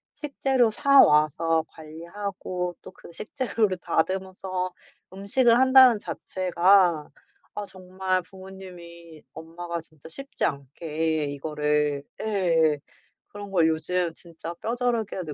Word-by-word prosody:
식재료 270 -4 +1
사 280 +3 +4
와서 155 +2 +2
관리하고 175 +3 -6
또 - - -12
그 - - -15
식재료를 215 -2 -2
다듬어서 185 +1 -2 0.4
음식을 230 +5 +2
한다는 260 -4 +6
자체가 180 -4 +1 0.5
아 205 - -4
정말 185 0 -3
부모님이, 175 -4 -13
엄마가 170 +2 -7
진짜 155 -2 -17
쉽지 275 - -4
않게 155 +2 -2
이거를 150 0 -1 0.2
예. 170 -7 +2 0.5
그런 205 -1 -9
걸 170 -4 +3
요즘 165 +2 -1
진짜 170 -1 -9
뼈저리게 230 -2 -2
느 155 - -7
180 Hz, 240 characters per minute, -25 LUFS, 160-200 Hz, 0.5 s, 한다는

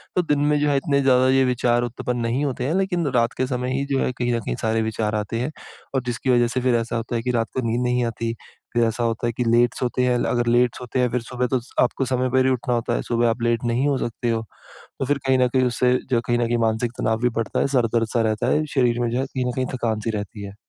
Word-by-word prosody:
तो 180 - +4
दिन 150 -4 0
में 150 0 +2
जो 145 0 +2
है 140 - +2
इतने 140 0 +1
ज़्यादा 130 -1 +4
ये 135 0 +4
विचार 120 -1 +1
उत्पन्न 120 +1 -3
नहीं 120 +5 0
होते 130 -3 -2
हैं, 145 - 0
लेकिन 180 -4 0
रात 115 -1 +2
के 130 - 0
समय 125 -1 -2
ही 140 - -1
जो - - +1
है, - - 0
कहीं 120 -1 -1
न - - 0
कहीं - - -3
सारे 110 0 +1
विचार 110 -1 -1
आते 105 +2 -2
हैं। 125 +5 -2 0.4
और 135 - +2
जिसकी 125 +2 -3
वज़ह 120 -1 +4
से 130 +2 -2
फिर 125 0 +2
ऐसा 115 0 -1
होता 115 +1 -3
है 115 - 0
कि 125 +2 -1
रात 115 -2 0
को 130 - 0
नींद 115 +2 0
नहीं 125 0 +1
आती। 115 0 -3 0.4
फिर 120 0 +3
ऐसा 115 +1 0
होता 115 0 -1
है 120 - -1
कि 125 - -1
लेट 120 +1 +3
सोते 125 0 0
हैं, 125 -1 +2
अगर 120 -1 0
लेट 120 0 +3
सोते 125 +1 -4
हैं, 125 -1 +2
फिर 125 - 0
सुबह 125 +2 -2
तो 130 +1 0 0.2
आपको 130 +2 0
समय 130 0 0
पर 130 +1 +3
ही 130 - +3
उठना 125 -1 -1
होता 115 - -1
है, - - -1
सुबह 120 0 +1
आप 115 +1 -2
लेट 120 0 +1
नहीं 120 +4 +1
हो 140 -2 +1
सकते 120 -1 -3
हो। 115 -1 0 0.6
तो - - 0
फिर 145 +2 +1
कहीं 130 0 +3
न 125 - +4
कहीं 130 +1 +1
उससे, 125 +1 +2 0.2
जो 120 -3 +2
कहीं 120 - +2
न 120 - +2
कहीं 120 +1 +1
मानसिक 110 +2 -1
तनाव 110 0 +1
भी 125 - +3
बढ़ता 115 - -1
है, - - +2
सर 120 -2 +3
दर्द-सा 115 0 +1
रहता 110 -1 -1
है, 155 +1 +2
शरीर 120 -3 +2
में 120 - 0
जो 120 +2 -1
है, 135 - 0
कहीं 130 -2 -3
न 125 - 0
कहीं 130 - 0
थकान-सी 115 -3 -2
रहती 105 0 -6
है। 100 0 -9
120 Hz, 285 wpm, -23 LUFS, 115-130 Hz, 0.6 s, तो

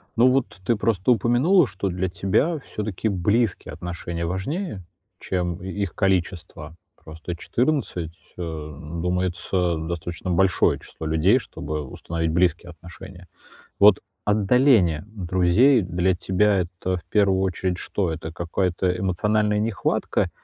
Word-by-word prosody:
Ну 120 +3 +5
вот 130 -6 -1
ты 115 - +2
просто 110 0 +1
упомянула, 125 - +4
что 95 -1 -3
для 90 +1 -2
тебя 100 - 0
все-таки 105 -5 -4
близкие 105 +3 0
отношения 85 -1 -5
важнее, 100 - -3 0.4
чем 90 -1 -2
и 95 - -5
их 100 -3 -3
количество. 90 -4 -1 0.3
Просто 80 +2 -7
14 110 - -1 0.2
а, - - -6 0.6
думается 90 0 0
достаточно 85 +2 -4
большое 95 +1 +3
число 80 - -8
людей, 80 +10 +3
чтобы 75 - -5
установить 80 +3 -3
близкие 85 0 +1
отношения. 90 +2 -12 0.5
Вот 100 -1 +7 0.3
отдаление 105 - +3
друзей 100 +5 +3
для 90 0 0
тебя 95 +3 +2
это, 90 +1 -3
в 85 - -12
первую 100 -3 +3
очередь, 95 -1 -1
что? 90 -1 -2
Это 80 0 -6
какая-то 90 +2 -1
эмоциональная 105 +3 +1
нехватка 110 -1 0
95 Hz, 125 wpm, -23 LUFS, 85-105 Hz, 0.6 s, Вот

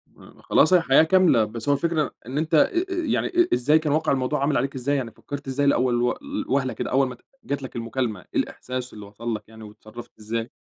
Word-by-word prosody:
م - - -19
ما - - -17
خلاص 160 +5 +3
الحياة 160 -4 +5
كاملة، 175 -8 +4
بس 115 +5 -5
هو 140 - +5
الفكرة 160 -1 0
إن 130 +5 -5
أنت 160 +1 -2
أ 155 - +6
أ - - 0
يعني 355 -3 0
أ 350 -1 +2
إزاي 150 +6 +3
كان 150 -2 -1
واقع 155 -1 +1
الموضوع 135 +2 0
عامل 140 +1 +1
عليك 135 +3 -1
إزاي؟ 135 +3 -1
يعني 125 -5 -3
فكّرت 145 -1 -8
إزاي 140 +2 0
لأول 125 -3 +2
و 125 - +2
ل 285 0 -5
وهلة 135 -1 0
كده - - -4
أول 135 +1 +3
ما 125 - -6
ات - - -17 0.2
جات 140 -8 -3
لك 130 - -8
المكالمة، 115 -3 -2 0.2
إيه - - +3
الإحساس 125 0 -4
اللي 105 -1 -9
وصل 110 +3 -5
لك 105 - -7
يعني، 110 0 -12
واتصرّفت 110 +2 -12
إزاي؟ 115 +2 -4
135 Hz, 240 wpm, -24 LUFS, 120-150 Hz, 0.2 s, أ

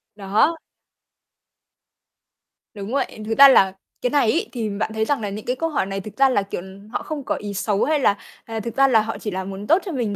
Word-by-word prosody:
Đó. 210 +11 +1 2.2
Đúng 205 +2 -7
vậy. 275 -5 -2
Thực 225 +2 -2
ra 280 - +11
là 195 -8 +5 0.3
cái 250 - +1
này 275 -6 +3
ấy, 335 - -1
thì 230 -4 -3
bạn 210 +2 -3
thấy 220 0 0
rằng 280 -3 0
là 205 - -3
những 205 +2 -7
cái 250 - -1
câu 330 +3 -2
hỏi 290 -11 0
này 195 0 -4
thực 210 +3 -11
ra 270 0 +5
là, 250 -6 +2
kiểu, 195 -2 -5 0.3
họ - - -3
không 300 -3 -5
có - - -1
ý 205 -1 -6
xấu 200 +1 0
hay 305 0 +1
là, 205 -6 +2 0.3
à, 225 -1 -5
thực 230 +1 -6
ra 275 0 +5
là 225 -4 +4
họ 225 +1 -4
chỉ 210 - -5
là 190 +1 -3
muốn 195 +2 -7
tốt 335 +4 +4
cho 365 - -4
mình 235 -7 -2
220 Hz, 240 wpm, -22 LUFS, 200-270 Hz, 2.2 s, ra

